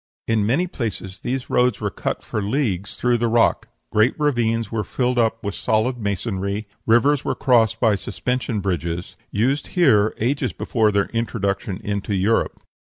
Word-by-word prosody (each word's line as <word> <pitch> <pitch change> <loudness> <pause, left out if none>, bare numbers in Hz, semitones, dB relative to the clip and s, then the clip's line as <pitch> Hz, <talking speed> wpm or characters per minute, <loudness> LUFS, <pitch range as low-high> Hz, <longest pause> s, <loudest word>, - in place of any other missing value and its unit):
In 110 -2 +2
many 135 +10 +2
places 110 - -5
these 130 0 -3
roads 125 -2 +2
were - - -2
cut - - -3
for 110 - -3
leagues 100 -4 -1
through 120 -1 +1
the 120 - +1
rock; 115 0 +2 0.2
great 110 +7 +2
ravines 115 -7 +1
were 110 -2 -1
filled 125 +4 0
up 115 -1 +1
with 100 -1 -2
solid 115 +5 0
masonry; 100 0 -2 0.2
rivers 130 +5 +4
were - - -1
crossed 115 -3 +3
by 110 -3 +4
suspension 125 +2 -2
bridges, 85 -2 -3
used 130 +8 0
here 110 -11 +4
ages 130 +6 0
before 110 -4 +1
their 100 -1 +1
introduction 100 -4 -2
into 100 0 -2
Europe. 100 +5 0
110 Hz, 155 wpm, -22 LUFS, 100-125 Hz, 0.2 s, rivers